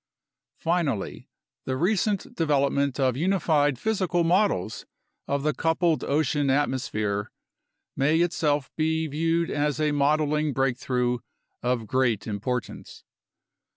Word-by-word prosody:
Finally, 165 - -2 0.4
the 130 0 -2
recent 195 +4 0
development 140 -3 +1
of 130 -3 +2
unified 155 -4 +2
physical 185 - 0
models 165 - +1 0.4
of 140 0 -1
the 150 0 +1
coupled 165 0 +1
ocean 145 -1 +1
atmosphere 110 -7 0 0.7
may 150 +4 +2
itself 150 -5 0
be 160 0 0
viewed 165 +3 0
as 150 0 0
a 155 -1 +2
modeling 150 +1 +1
break 135 -1 +1
through 125 -1 -1 0.4
of 120 -2 0
great 120 -3 +1
importance. 115 +4 -4
145 Hz, 110 wpm, -26 LUFS, 130-165 Hz, 0.7 s, of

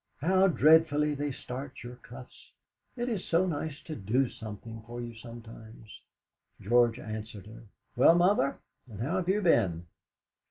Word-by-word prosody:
How 185 +6 +4
dreadfully 155 -3 +4
they 145 0 -3
starch 130 +1 -8
your 120 0 -9
cuffs! 125 +1 -14 0.4
It 240 0 -2
is 220 -7 -2
so 170 +3 +2
nice 155 -3 -3
to 160 - -6
do 120 +5 0
something 110 +1 -9
for 120 +1 -7
you 120 -1 -6
sometimes!" 115 -1 -12 0.6
George 120 +2 +3
answered 110 -3 -7
her: 110 +2 -12 0.3
"Well, 135 +7 +6
Mother, 175 -6 +3 0.3
and 105 -3 -10
how 145 +11 -1
have 185 -1 -2
you 205 +2 +2
been?" 90 - +2
125 Hz, 150 wpm, -29 LUFS, 115-160 Hz, 0.6 s, Well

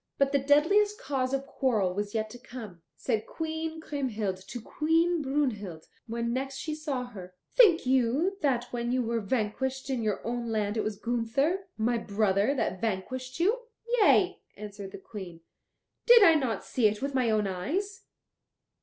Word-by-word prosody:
But 275 0 +2
the 280 - +3
deadliest 360 +10 +3
cause 260 -2 -1
of 275 0 -1
quarrel 220 -10 0
was 205 +2 -3
yet 220 -1 -1
to 245 - -10
come. 220 -9 -10
Said 220 -4 -2
Queen 320 0 -4
Kriemhild 230 -11 -2
to 245 - -6
Queen 325 +7 +1
Brunhild 230 - -2 0.2
when 235 +1 -2
next 270 +1 -3
she 310 +3 -4
saw 300 -4 -3
her: 185 -6 -11 0.2
"Think 395 - +6
you 265 +9 +2
that 260 -5 +2
when 240 0 -1
you 255 0 +1
were 230 0 -1
vanquished 260 +5 -2
in 255 -3 -1
your 215 -3 -2
own 235 0 -2
land 210 -1 -1
it 220 - 0
was 215 -2 -3
Gunther, 245 - 0
my 230 +2 +1
brother, 205 +3 +1
that 190 -7 -2
vanquished 255 - -3
you?" 415 +8 +2 0.4
"Yea," 380 -3 +4 0.2
answered 205 -1 -8
the - - -8
Queen, 190 -5 -9 0.7
"did 475 -2 +9
I 330 - +8
not 260 -9 -1
see 235 -4 +2
it 210 +4 -2
with 280 0 -2
my 255 -3 +2
own 215 -1 +2
eyes?" 330 - -3
245 Hz, 170 wpm, -29 LUFS, 215-290 Hz, 0.7 s, did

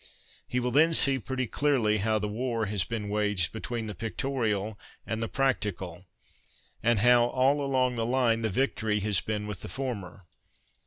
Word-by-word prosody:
He 125 - -1
will 125 0 -1
then 160 +5 +4
see 135 -3 +2
pretty 130 +2 -3
clearly 120 -6 +1
how 110 +2 +1
the 105 0 -2
war 115 +1 -2
has 100 -3 +1
been 110 -3 -4
waged 105 -4 +1
between 115 +1 -4
the 105 - -5
pictorial 110 -1 -2 0.3
and 110 0 -3
the 115 - -1
practical, 100 -9 -2 0.7
and 115 -2 +2
how, 120 +1 +6
all 135 +3 +2
along 130 -2 +1
the 115 - 0
line, 120 -3 +2
the 110 - 0
victory 110 -2 0
has 105 -1 +2
been 105 -1 -3
with 105 -4 -6
the - - -7
former. 100 -6 -5
115 Hz, 170 wpm, -28 LUFS, 105-130 Hz, 0.7 s, how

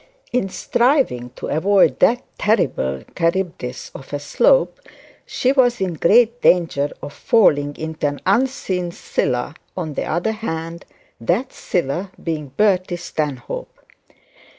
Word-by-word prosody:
In 245 -6 +1
striving 240 - +1
to - - -7
avoid 165 -4 +3
that 245 +2 +3 0.2
terrible 70 - 0
Charybdis 165 -7 -2
of 135 - -11
a 145 - -1
Slope - - +2 0.5
she 255 - +1
was 245 -3 +3
in 185 -2 -1
great 235 +9 +3
danger 160 -5 +3
of 145 - -7
falling 145 -10 +3
into 160 -1 -3
an 145 0 -4
unseen 190 -5 0
Scylla 125 -4 -2 0.2
on 160 -4 -3
the - - -2
other 175 +7 0
hand, 170 -6 -5 0.3
that 190 - -1
Scylla 175 +3 -2
being 155 -3 -3
Bertie 185 +4 +1
Stanhope. 150 -7 -5
175 Hz, 125 wpm, -20 LUFS, 145-220 Hz, 0.5 s, avoid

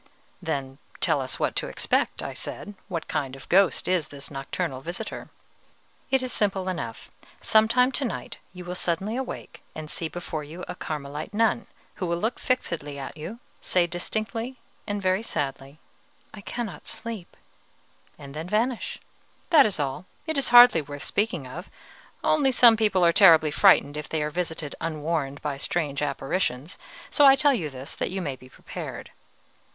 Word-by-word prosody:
"Then 135 0 -3 0.2
tell - - +3
us - - -3
what - - 0
to - - -1
expect," - - 0
I - - -4
said; 205 - -6
"what 170 -5 -4
kind 135 -2 -2
of 135 - -11
a - - -16
ghost 190 +1 +3
is 180 -4 +1
this 140 0 -9
nocturnal 135 -1 -3
visitor?" 175 +9 -6 0.8
"It 265 -1 +2
is 255 - -3
simple 195 -3 0
enough. 145 -12 -5 0.3
Some 220 0 +4
time 250 +3 +4
to 275 - -1
night 240 - -5
you 180 -1 -10
will 175 - -4
suddenly 185 +5 -1
awake 260 0 -6
and 155 -1 -6
see 165 - -2
before 160 -3 -5
you 165 +5 -8
a - - -4
Carmelite 150 +2 -5
nun 225 +1 +2 0.3
who 185 - -2
will 170 0 0
look 220 +7 -1
fixedly 160 - -2
at 135 - -6
you, 165 +9 -7 0.2
say 180 -1 +2
distinctly 220 +8 -3 0.3
and 205 -1 -2
very 185 +2 +2
sadly, 135 -7 -4 0.6
'I 210 - -9
cannot 225 -1 -5
sleep,' 220 -6 -6 0.8
and 140 -1 -10
then 160 +4 -5
vanish. 230 +4 0 0.5
That 295 -8 +8
is 200 - -4
all, 145 +6 -2 0.2
it 315 -1 -2
is 275 - +1
hardly 240 -7 +9
worth 145 0 -8
speaking 200 -9 -1
of, 155 +8 -8 0.5
only 290 -4 +3
some 240 -2 +7
people 210 -5 +3
are 170 - +5
terribly 165 -6 +7
frightened 150 -5 +5
if 150 0 -6
they 155 -2 0
are 150 - -2
visited 160 -3 -3
unwarned 155 -3 -2
by 145 -2 -2
strange 145 -1 -1
apparitions; 145 +1 -2 0.3
so 290 - +4
I 270 - +9
tell 290 0 +4
you 170 - -2
this 135 0 -7
that - - -2
you 190 - -3
may 145 -7 -3
be 130 0 -16
prepared." - - -8
175 Hz, 175 wpm, -26 LUFS, 145-220 Hz, 0.8 s, hardly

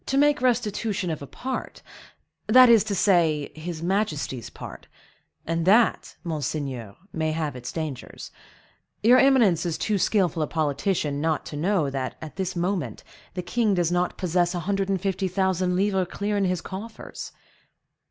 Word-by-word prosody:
"To 270 - 0
make 295 0 +4
restitution 215 -6 0
of 155 - -4
a 140 - -7
part,—that 255 - 0
is 230 -3 +7
to 205 -2 -2
say, 170 -6 +2
his 160 +1 -6
majesty's 165 - -1
part; - - -10 0.6
and 165 0 -1
that, 225 +4 +3
monseigneur, 140 - -4 0.2
may 160 -1 -1
have 155 -4 -2
its 125 0 -6
dangers. 155 -6 -6 0.7
Your 245 +4 +7
eminence 235 - +4
is 170 -3 -2
too 210 -2 0
skillful 180 -5 +1
a 155 - 0
politician 150 -1 -1
not 160 -1 0
to - - -7
know 160 -2 +1
that, 130 -1 -3
at 155 -1 -9
this 190 -1 -3
moment, 170 - -2 0.3
the 180 - -3
king 210 +3 +1
does 175 -2 +1
not 180 0 0
possess 180 -1 +1
a 175 - -2
hundred 195 +2 -1
and 195 -1 +1
fifty 195 0 -1
thousand 185 -1 0
livres 190 -1 +1
clear 205 +1 -2
in 200 -1 +2
his 180 -2 0
coffers." 215 +4 -8
180 Hz, 160 wpm, -25 LUFS, 155-205 Hz, 0.7 s, is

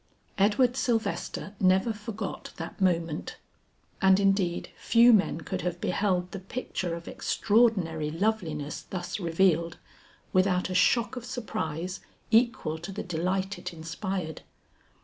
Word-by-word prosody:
Edward 230 +5 +3
Sylvester 225 -4 -1
never 190 +4 +3
forgot 210 -1 -6
that 165 +3 -7
moment, 170 -4 0 0.6
and 190 0 +6
indeed 195 -3 +1
few 235 +1 +5
men 195 -5 +2
could - - -4
have 175 +1 -3
beheld 180 -1 0
the 195 - -5
picture 185 -4 -4
of 170 0 -9
extraordinary 190 -9 +1
loveliness 165 -5 -2
thus 180 +1 -4
revealed, 170 -1 +2 0.6
without 185 -1 +2
a - - -1
shock 230 +6 +3
of 245 - -6
surprise 185 -7 -4 0.3
equal 230 -9 +2
to 170 +4 -7
the 195 - -5
delight 185 +3 -1
it 175 - -6
inspired. 165 0 -4
185 Hz, 125 wpm, -28 LUFS, 170-210 Hz, 0.6 s, and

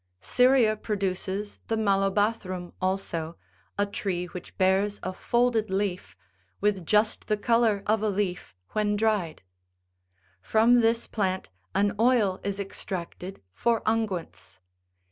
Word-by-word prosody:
Syria 250 - +4
produces 200 -1 -3
the 225 - 0
malobathrum86 195 -2 0
also, 175 -3 -2 0.4
a 205 - +2
tree 190 -3 -3
which 180 0 -10
bears 195 +2 +2
a 185 - -3
folded 235 +1 +1
leaf, 190 - -2 0.4
with 195 -5 0
just 210 0 +2
the 215 - +1
colour 225 -2 +2
of 215 0 +2
a 215 - +1
leaf 190 - -2 0.2
when 210 -1 +1
dried. 205 - 0 1.0
From 230 - +4
this 230 +1 +2
plant 190 -3 -2 0.3
an 200 +1 +2
oil 225 -6 +3
is 200 0 -3
extracted 190 - -6
for 230 - +1
unguents. 175 - -2
205 Hz, 120 wpm, -27 LUFS, 185-220 Hz, 1.0 s, Syria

